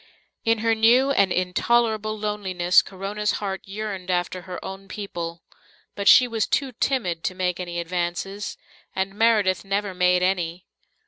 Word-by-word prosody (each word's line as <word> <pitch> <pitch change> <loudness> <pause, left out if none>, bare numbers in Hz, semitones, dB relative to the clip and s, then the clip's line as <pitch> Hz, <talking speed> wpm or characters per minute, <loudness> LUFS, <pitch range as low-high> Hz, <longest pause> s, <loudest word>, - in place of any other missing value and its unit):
In 225 0 +2
her 225 - +4
new 240 +5 +4
and 200 -8 +3
intolerable 215 +4 +1
loneliness 190 -4 +2
Corona's 205 +2 -3
heart 195 -2 -3
yearned 195 -2 -6
after 180 0 -1
her 180 0 -7
own 195 +1 -8
people. 170 -5 -6 0.5
But 200 -1 -4
she 250 +4 +8
was 225 -5 -1
too 275 -2 0
timid 220 -10 -1
to 185 - -1
make 180 -1 -1
any 175 -1 -4
advances, 175 +4 -3 0.4
and 190 +1 -1
Meredith 210 -3 +2
never 195 0 -2
made 180 0 +3
any. 180 -2 -1
195 Hz, 145 wpm, -24 LUFS, 180-215 Hz, 0.5 s, she